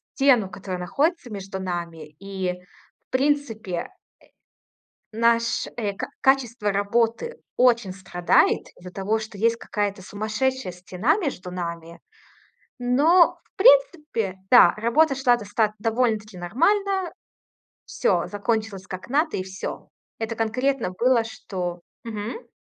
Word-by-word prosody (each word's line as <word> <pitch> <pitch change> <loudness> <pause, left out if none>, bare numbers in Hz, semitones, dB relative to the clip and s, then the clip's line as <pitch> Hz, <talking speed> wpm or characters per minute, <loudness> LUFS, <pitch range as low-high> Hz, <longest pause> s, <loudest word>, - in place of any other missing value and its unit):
стену, 250 -8 +4
которая 185 -1 -6
находится 285 - -1
между 195 -1 -6
нами. 170 -4 -5
И, 190 -2 -3 0.5
в - - -
принципе, 260 -7 0
э, 170 - -2 1.3
наш, 230 0 +2
э, 205 -4 -1
ка - - -5
качество 240 -6 +2
работы 230 - 0 0.2
очень 235 -6 +3
страдает 180 -2 +2
из-за 180 0 -11
того, 200 +4 -1
что 220 -2 -8
есть 230 +2 +2
какая-то 205 -3 -3
сумасшедшая 215 +3 -2
стена 185 - 0
между 255 - -4
нами, 170 -2 -6 0.8
но, 295 +9 +4
в - - -39
принципе, 345 - +3
да, 245 - +8
работа 275 +7 +3
шла 255 -2 +4
достат 210 0 0
довольно-таки 220 -3 0
нормально. 380 - +1 0.7
Всё - - 0
закончилось 210 -2 -2
как 185 0 -7
надо, 305 - +1
и 185 - -2
всё. 190 +1 -7 0.3
Это 225 0 -3
конкретно 230 +1 0
было, 235 +5 +2
что 180 -5 -5 0.2
Мгм. 225 - -6
220 Hz, 120 wpm, -24 LUFS, 190-260 Hz, 1.3 s, да